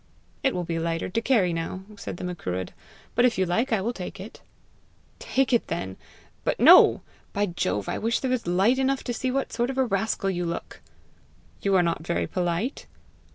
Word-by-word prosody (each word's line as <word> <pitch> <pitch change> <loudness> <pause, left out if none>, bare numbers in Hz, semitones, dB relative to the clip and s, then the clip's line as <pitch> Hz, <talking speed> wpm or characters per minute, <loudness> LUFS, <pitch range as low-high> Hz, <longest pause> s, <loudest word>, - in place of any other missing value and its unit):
"It 265 - +1
will 180 - -1
be 165 -1 -2
lighter 165 +1 -2
to 230 +5 -1
carry 215 -8 +2
now!" 165 +3 -4
said 200 - -7
the - - -7
Macruadh; 95 - -4 0.4
"but 240 - +3
if 245 -2 +3
you 190 - +2
like 225 +9 0
I 220 -4 +2
will 235 +5 -1
take 190 -2 -7
it." 200 +4 -10 0.8
"Take 265 -1 0
it, 235 - +2
then. 95 0 -4 0.5
But - - -1
no! - - +8 0.3
By 205 +1 +1
Jove, 170 - -2
I - - -2
wish 230 +2 0
there 260 - -2
was 250 -7 -1
light 195 +9 +3
enough 270 0 +1
to 245 - -3
see 255 +2 -2
what 270 +1 -2
sort 240 +1 0
of 265 - -4
a 265 - +3
rascal 195 -2 0
you 175 -1 -2
look!" 170 0 -5 0.8
"You 195 -1 +2
are 180 - +5
not 170 -2 -1
very 170 - 0
polite!" 180 +8 -2
195 Hz, 200 wpm, -26 LUFS, 175-240 Hz, 0.8 s, no